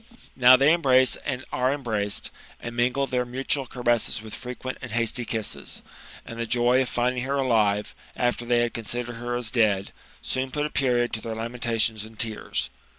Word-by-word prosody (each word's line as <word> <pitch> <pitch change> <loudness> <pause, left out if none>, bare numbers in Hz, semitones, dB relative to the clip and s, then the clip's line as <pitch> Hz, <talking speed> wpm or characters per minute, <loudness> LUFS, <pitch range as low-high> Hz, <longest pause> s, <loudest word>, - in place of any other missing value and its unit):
Now 125 0 +8
they 140 +4 +5
embrace 130 -6 +4
and 130 -2 -4
are 130 +1 +1
embraced, 110 -8 -2 0.3
and 120 0 -7
mingle 125 +3 +1
their 125 -2 0
mutual 130 +2 -1
caressess 120 -2 0
with 110 0 -9
frequent 125 +1 -6
and 120 -4 -7
hasty 115 +1 0
kisses; 110 -2 -4 0.4
and 115 - -8
the 115 - -2
joy 120 +2 +3
of 130 - -1
finding 125 +1 0
her 135 +3 -1
alive, 110 -6 +2 0.2
after 120 0 0
they 120 0 +2
considered 120 +1 -4
her 120 +1 -3
as 120 -3 -1
dead, 105 -5 +2 0.3
soon 130 0 -1
put 150 +3 -1
a 150 - -4
period 125 -3 +1
to 110 - -2
their 115 0 -5
lamentations 115 -2 0
and 110 0 -12
tears. 105 - -2
120 Hz, 175 wpm, -25 LUFS, 115-130 Hz, 0.4 s, Now